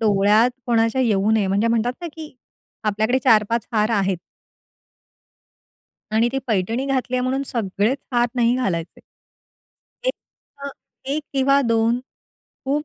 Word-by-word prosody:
डोळ्यात 210 Hz, +2 st, +4 dB, 0.2 s
कोणाच्या 230 Hz, +1 st, +2 dB
येऊ 210 Hz, -4 st, +2 dB
नये, 220 Hz, -3 st, +2 dB
म्हणजे 200 Hz, +4 st, +1 dB
म्हणतात 230 Hz, +1 st, +1 dB
ना, 345 Hz, -, -5 dB
की 310 Hz, -2 st, -10 dB, 0.5 s
आपल्याकडे 220 Hz, +4 st, +1 dB
4-5 225 Hz, +1 st, +3 dB
हार 215 Hz, 0 st, +2 dB
आहेत. 195 Hz, -2 st, +1 dB, 1.9 s
आणि 220 Hz, +2 st, +2 dB
ती 270 Hz, -, 0 dB
पैठणी 225 Hz, +4 st, -1 dB
घातल्या 255 Hz, -2 st, -1 dB
म्हणून 260 Hz, +2 st, -1 dB
सगळेच 220 Hz, +2 st, -1 dB
हार 240 Hz, 0 st, +3 dB
नाही 240 Hz, 0 st, +3 dB
घालायचे. 180 Hz, -9 st, -3 dB, 1.1 s
1 -, -, +2 dB, 0.5 s
अ, -, -, -3 dB, 0.4 s
1 290 Hz, +3 st, -2 dB
किंवा 275 Hz, 0 st, +3 dB
2 230 Hz, 0 st, +1 dB, 0.6 s
खूप 290 Hz, +3 st, -1 dB
230 Hz, 125 wpm, -21 LUFS, 210-255 Hz, 1.9 s, डोळ्यात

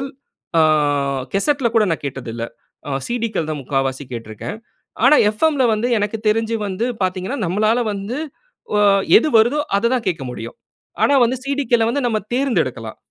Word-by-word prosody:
CDகள் 270 Hz, -, -4 dB, 0.5 s
ஆ -, -, +6 dB, 0.7 s
கேசெட்‌ல 260 Hz, +5 st, +1 dB
கூட 220 Hz, -2 st, +5 dB
நான் 160 Hz, -, -2 dB
கேட்டது 135 Hz, -4 st, -5 dB
இல்ல. 115 Hz, -, -4 dB, 0.4 s
ஆ -, -, -4 dB, 0.2 s
CDகள் 230 Hz, -9 st, -2 dB
தான் 150 Hz, -, -3 dB
3/4வசி 135 Hz, +1 st, -2 dB
கேட்டுருக்றேன். 115 Hz, -, -6 dB, 0.5 s
ஆனா, 300 Hz, +3 st, +7 dB, 0.2 s
FMல 300 Hz, -2 st, +2 dB
வந்து 215 Hz, +3 st, 0 dB
எனக்கு 205 Hz, +2 st, -1 dB
தெரிஞ்சி 225 Hz, +1 st, +1 dB
வந்து 195 Hz, +4 st, -2 dB, 0.2 s
பாத்தீங்கன்னா, 185 Hz, +8 st, -2 dB
நம்ளால 215 Hz, +7 st, +1 dB
வந்து 200 Hz, +6 st, -4 dB, 0.6 s
ஒ -, -, +3 dB, 0.4 s
எது 275 Hz, -, +2 dB
வருதோ 240 Hz, +7 st, +3 dB, 0.2 s
அத 230 Hz, +4 st, +2 dB
தான் 240 Hz, -4 st, -1 dB
கேட்க 165 Hz, -6 st, -1 dB
முடியும். 115 Hz, -1 st, -8 dB, 0.5 s
ஆனா, -, -, +4 dB
வந்து 250 Hz, +2 st, +1 dB
CDக்கள்ள 270 Hz, -5 st, +1 dB
வந்து 255 Hz, +1 st, -1 dB
நம்ப 220 Hz, -2 st, 0 dB
தேர்ந்தெடுக்கலாம். 160 Hz, -, -1 dB
215 Hz, 155 wpm, -19 LUFS, 155-245 Hz, 0.7 s, ஆனா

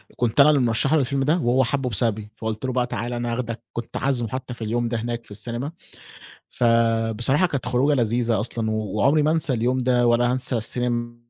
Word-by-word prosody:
كنت 120 Hz, +2 st, -1 dB
أنا 140 Hz, +2 st, +8 dB
اللي 145 Hz, -3 st, +3 dB
مرشّح 125 Hz, +5 st, +1 dB
له 155 Hz, -, +4 dB
الفيلم 135 Hz, +1 st, 0 dB
ده 155 Hz, +6 st, +2 dB
وهو 130 Hz, -3 st, +2 dB
حَبُه 130 Hz, +1 st, -1 dB
بسببي 105 Hz, -1 st, -1 dB
فقُلت 110 Hz, +2 st, -4 dB
له 130 Hz, -, -2 dB
بقى: 125 Hz, -1 st, 0 dB
"تعال، 120 Hz, +2 st, -4 dB
أنا 120 Hz, -1 st, -2 dB
هاخدك." 115 Hz, -2 st, -4 dB
كنت 120 Hz, 0 st, -5 dB
عازمه 125 Hz, -4 st, 0 dB
حتى 130 Hz, +1 st, -5 dB
في 115 Hz, -, -7 dB
اليوم 120 Hz, +2 st, -1 dB
ده 120 Hz, -, -2 dB
هناك 115 Hz, +1 st, -4 dB
في -, -, -19 dB
السينما. 120 Hz, +7 st, -4 dB, 0.8 s
فبصراحة 115 Hz, -, +2 dB
كانت 140 Hz, -7 st, -4 dB
خروجة 130 Hz, +4 st, +2 dB
لذيذة 115 Hz, -3 st, +1 dB
أصلًا 110 Hz, 0 st, -2 dB
و 110 Hz, -, -1 dB, 0.2 s
وعمري 140 Hz, +9 st, +3 dB
ما 150 Hz, -, +2 dB
أنسى 160 Hz, -4 st, +1 dB
اليوم 125 Hz, +2 st, 0 dB
ده 125 Hz, -1 st, +2 dB
ولا 120 Hz, +1 st, +3 dB
هانسى 125 Hz, -1 st, 0 dB
السينما 120 Hz, +1 st, -1 dB
120 Hz, 205 wpm, -23 LUFS, 115-130 Hz, 0.8 s, أنا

